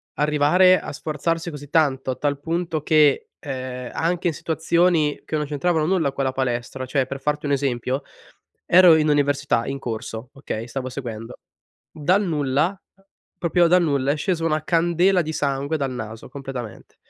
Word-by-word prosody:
arrivare 150 +5 +4
a - - -7
sforzarsi 165 +3 -2
così 145 -3 -9
tanto, 135 -4 +1
a 125 - -3
tal 145 -1 -1
punto 165 0 -2
che, 150 -3 +3
ehm, 130 -3 -6
anche 175 +2 0
in 170 - +1
situazioni, 160 0 +1
che - - -3
non 150 - -1
c'entravano 155 +2 0
nulla 165 -5 +1
con 135 0 -3
la 130 - +1
palestra, 130 0 -3
cioè 130 +1 0
per 135 +1 -6
farti 150 0 -1
un 145 - -1
esempio, 130 -1 -1 0.6
ero 180 -2 +7
in 155 -1 +2
università 145 -5 +1
in 135 0 -3
corso, 115 0 -6
okay, 120 -5 -5
stavo 130 +1 -4
seguendo. 115 -4 -7 0.6
Dal 180 +7 +1
nulla, 155 +2 0 0.6
proprio 175 0 +3
dal 180 +1 +5
nulla, 140 -3 +1
è - - -2
scesa 165 +2 -1
una 155 -1 0
candela 175 +3 +2
di 155 0 -4
sangue 140 +1 -1
dal 140 -3 -2
naso, 110 -2 -7
completamente. 130 -5 -8
145 Hz, 165 wpm, -22 LUFS, 135-165 Hz, 0.6 s, ero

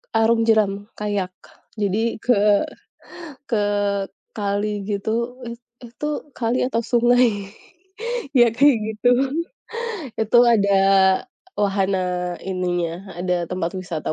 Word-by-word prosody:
Arung 225 +1 +3
jeram, 205 -2 +2
kayak, 200 -3 -3 0.4
jadi 215 +2 0
ke 250 - +4 1.1
ke 220 -4 0 0.7
kali 205 0 -2
gitu 235 +5 -2
it 235 0 -7 0.2
itu 240 +5 -6 0.3
kali 235 +1 0
atau 230 -3 -1
sungai 235 -4 +2 0.8
ya 240 -1 +7
kayak 280 -1 +5
gitu. 220 +3 -2 1.1
Itu 220 +2 +4
ada 200 -4 +3 0.9
wahana 185 -3 0
ininya, 180 -1 -3
ada 180 -1 0
tempat 180 -1 -2
wisata 170 -5 -4
205 Hz, 100 wpm, -22 LUFS, 190-230 Hz, 1.1 s, ya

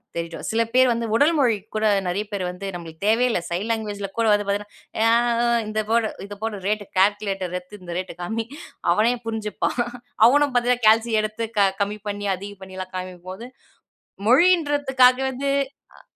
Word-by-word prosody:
தெரியட்டும். 170 0 -5
சில 230 +1 +2
பேர் 255 0 +5
வந்து 230 0 -1
உடல் 295 +7 +4
மொழிக்கு 220 -6 +1
கூட 215 0 +1 0.2
நெறைய 195 +4 -1
பேர் 200 -2 -2
வந்து 180 +2 -7
நம்பளுக்கு 165 +1 -9
தேவையே 235 +3 +4
இல்ல. 180 - +1
சைன் 180 +6 -2
லாங்குவேஜ்ல 205 -3 -3
கூட 230 - +2
வந்து 205 0 +1
பாத்தீங்கன்னா, 205 +1 -2 0.3
ஏன்னா 225 0 +4 0.3
"ஆ - - +2 0.2
இந்த 215 0 -1
போடு. 230 -1 +3 0.2
இத 205 0 -8
போடு. 220 -2 -2
ரேட் 210 0 0 0.2
கால்குலேட்டர் 195 -2 +1
எடுத்து 185 +3 -11
இந்த 175 -1 -7
ரேட்டு 185 -2 -5
காமி." 220 +5 -2 0.5
அவனே 220 +6 +3
புரிஞ்சுப்பான். 220 +2 -2 0.5
அவனும் 285 +1 +3
பாத்தீங்கன்னா, 245 -1 +2
கால்சி 225 +1 +4
எடுத்து 215 +2 -3 0.2
அ - - +4
கம்மி 210 +1 -1
பண்ணி 205 0 -3
அதிகம் 200 +1 -10
பண்ணி 190 0 -10 0.2
காமிக்கும் 185 -1 -7
போது, 230 +6 -8 0.8
மொழின்றதுக்காக 285 -4 +4
வந்து 275 +2 -2 0.5
அ - - -17
215 Hz, 170 wpm, -23 LUFS, 195-235 Hz, 0.8 s, பேர்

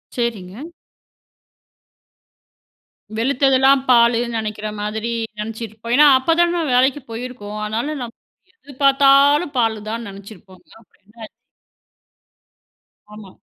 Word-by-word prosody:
சரிங்க. 235 - -5 2.5
வெளுத்ததுலாம் 265 +2 +3
பாலுனு 235 0 +4
நெனைக்கிற 215 -1 -5
மாதிரி, 220 +2 -4 0.3
நெனைச்சிருப் 220 +1 -7
ஏன்னா, 295 +1 +6
அப்ப 325 +5 +1
தான 345 -1 +1
வேலைக்கு 265 +3 +2
போயிருக்கோம். 225 -3 -7
அதனால 230 +8 -3
நம் 235 -1 -8 0.4
எது 285 -11 -16
பாத்தாலும் 280 +2 +4
பாலுதானு 225 0 -2
நெனைச்சிருப்போம். 195 -1 -14 0.2
அப்பறம் - - -31
என்னா 225 +2 -22
ஆச்சி? - - -14 1.8
ஆமா. 205 -3 -12
235 Hz, 95 wpm, -19 LUFS, 215-275 Hz, 2.5 s, ஏன்னா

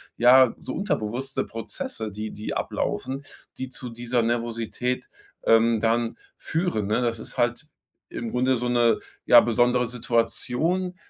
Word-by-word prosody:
ja, 125 +1 +6
so - - -6
unterbewusste 130 - -2
Prozesse, 110 -1 -5
die 105 +1 -5
die 105 - -5
ablaufen, 135 +2 -3 0.3
die 130 - -4
zu 125 -1 -6
dieser 120 +1 -1
Nervosität, 120 +1 -2 0.3
ähm, 115 0 +4
dann 115 +1 +1 0.2
führen, 160 - -1
ne? 110 +4 +1
Das 115 -2 -1
ist - - -8
halt - - 0 0.4
im 115 - -5
Grunde 130 +1 +2
so 125 0 -1
'ne, 120 -2 +3 0.3
ja, 120 - +9
besondere 120 +1 +2
Situation. 125 +9 0
120 Hz, 135 wpm, -25 LUFS, 115-125 Hz, 0.4 s, ja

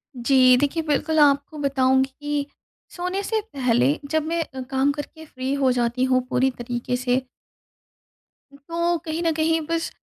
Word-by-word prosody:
जी, 255 0 +5
देखिए 290 +5 0
बिल्कुल 310 +1 0
आपको 285 +1 +3
बताऊँगी 265 -1 +2
कि, 290 -1 -2 0.5
सोने 365 +2 -2
से 445 +2 0
पहले 230 - +2
जब 315 -1 +1
मैं 335 +1 -1
अ, 265 -3 -9
काम 265 +2 0
करके 315 +2 -8
फ्री 260 -2 -4
हो 270 -2 +2
जाती 245 +1 0
हूँ 255 0 +3
पूरी 265 +1 +2
तरीके 240 +1 -3
से 250 +1 0 1.5
तो 340 +1 0
कहीं 315 +1 -3
न 330 - +2
कहीं 320 +1 +1
बस 330 0 -1
280 Hz, 155 wpm, -23 LUFS, 255-315 Hz, 1.5 s, जी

